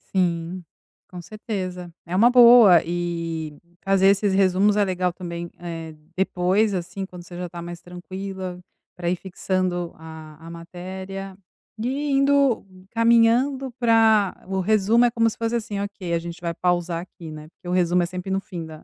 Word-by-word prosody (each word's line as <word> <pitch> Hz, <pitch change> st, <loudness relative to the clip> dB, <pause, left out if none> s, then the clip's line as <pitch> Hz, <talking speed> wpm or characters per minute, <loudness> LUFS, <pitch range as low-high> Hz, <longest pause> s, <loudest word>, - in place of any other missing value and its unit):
Sim, 175 Hz, 0 st, 0 dB, 0.5 s
com 180 Hz, -1 st, -8 dB
certeza. 185 Hz, -4 st, -6 dB
É 175 Hz, -, -4 dB
uma 225 Hz, +6 st, +6 dB
boa, 235 Hz, -7 st, +8 dB
eh, 165 Hz, -3 st, -3 dB, 0.3 s
fazer 195 Hz, 0 st, +3 dB
esses 200 Hz, 0 st, +3 dB
resumos 195 Hz, +1 st, +3 dB
é 205 Hz, -, +4 dB
legal 180 Hz, -1 st, -1 dB
também, 170 Hz, -1 st, -6 dB
é, 165 Hz, -2 st, -7 dB, 0.2 s
depois, 190 Hz, +3 st, +1 dB
assim, 185 Hz, +2 st, -4 dB
quando 180 Hz, -2 st, -11 dB
você 175 Hz, 0 st, -12 dB
já 180 Hz, 0 st, -5 dB
tá 170 Hz, 0 st, -8 dB
mais 175 Hz, 0 st, -8 dB
tranquila, 185 Hz, +1 st, -7 dB, 0.4 s
pra 175 Hz, -1 st, -2 dB
ir 180 Hz, -, +1 dB
fixando 180 Hz, -1 st, -2 dB
a 160 Hz, 0 st, -12 dB
a -, -, -8 dB
matéria 185 Hz, +3 st, -8 dB, 0.4 s
e 270 Hz, +6 st, -2 dB
indo 275 Hz, -3 st, +3 dB, 0.2 s
caminhando 235 Hz, +4 st, +3 dB
pra 225 Hz, -4 st, +4 dB
o 190 Hz, 0 st, -2 dB
resumo 215 Hz, +4 st, +3 dB
é 240 Hz, -, +2 dB
como 230 Hz, -1 st, +2 dB
se -, -, -9 dB
fosse 230 Hz, +1 st, -1 dB
assim: 215 Hz, -3 st, -3 dB
"Ok, 200 Hz, -4 st, -4 dB
a -, -, +3 dB
gente 170 Hz, +1 st, -8 dB
vai 170 Hz, -1 st, -2 dB
pausar 175 Hz, -1 st, 0 dB
aqui, 170 Hz, -2 st, -11 dB
né." 155 Hz, 0 st, -9 dB
Porque 175 Hz, -, -16 dB
o -, -, -2 dB
resumo 180 Hz, 0 st, +2 dB
é -, -, +1 dB
sempre 180 Hz, +2 st, -6 dB
no 190 Hz, -, +1 dB
fim 175 Hz, -4 st, -7 dB
da, 155 Hz, -1 st, -11 dB
185 Hz, 170 wpm, -23 LUFS, 175-210 Hz, 0.5 s, boa